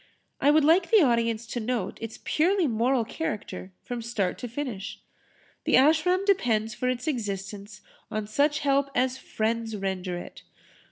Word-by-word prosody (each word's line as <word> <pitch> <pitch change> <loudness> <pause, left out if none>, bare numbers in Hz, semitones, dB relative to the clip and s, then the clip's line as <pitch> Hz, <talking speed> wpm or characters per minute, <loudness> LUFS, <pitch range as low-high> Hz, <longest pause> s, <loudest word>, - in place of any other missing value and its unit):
I 285 - +4
would 300 0 +5
like 340 +3 +4
the 440 -6 +6
audience 230 -3 +1
to 240 - -4
note 230 -4 -2
its 225 -1 -6
purely 360 +3 +2
moral 240 0 +1
character 210 - -5
from 245 -1 -4
start 225 -5 -2
to 245 - -4
finish. 235 -5 -5 0.7
The - - +4
Ashram 320 +7 +4
depends 225 - +2
for 250 +4 -1
its 250 -1 -2
existence 205 - -4 0.3
on 215 -1 -3
such 290 +8 +1
help 275 -1 +2
as 255 +1 +1
friends 225 0 -2
render 190 -2 -3
it. - - -9
235 Hz, 155 wpm, -27 LUFS, 215-290 Hz, 0.7 s, the